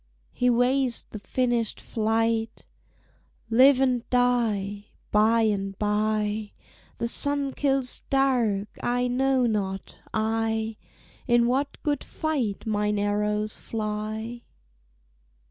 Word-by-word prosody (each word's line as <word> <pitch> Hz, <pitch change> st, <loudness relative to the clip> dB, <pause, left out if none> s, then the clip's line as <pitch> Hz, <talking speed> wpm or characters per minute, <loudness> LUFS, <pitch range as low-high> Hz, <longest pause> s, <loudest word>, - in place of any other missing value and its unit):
He 250 Hz, -, +1 dB
weighs 250 Hz, +1 st, +2 dB
the 215 Hz, -, -6 dB
finished 240 Hz, +2 st, -1 dB
flight: 225 Hz, 0 st, -1 dB, 0.9 s
"Live 260 Hz, +3 st, +6 dB
and 250 Hz, -3 st, +1 dB
die; 220 Hz, -5 st, +1 dB, 0.2 s
by 220 Hz, +2 st, +4 dB
and 195 Hz, -2 st, -1 dB
by 210 Hz, 0 st, 0 dB, 0.4 s
The 235 Hz, -, -1 dB
sun 285 Hz, +2 st, 0 dB
kills 270 Hz, -3 st, 0 dB
dark; 245 Hz, -7 st, +2 dB
I 245 Hz, +1 st, 0 dB
know 260 Hz, +1 st, +2 dB
not, 195 Hz, -4 st, -3 dB
I, 220 Hz, 0 st, -1 dB, 0.5 s
In 240 Hz, -1 st, +4 dB
what 270 Hz, +4 st, 0 dB
good 295 Hz, -1 st, 0 dB
fight 270 Hz, -11 st, -2 dB
mine 210 Hz, -1 st, 0 dB
arrows 210 Hz, +1 st, -1 dB
fly!" 220 Hz, +2 st, -4 dB
225 Hz, 100 wpm, -26 LUFS, 210-250 Hz, 0.9 s, Live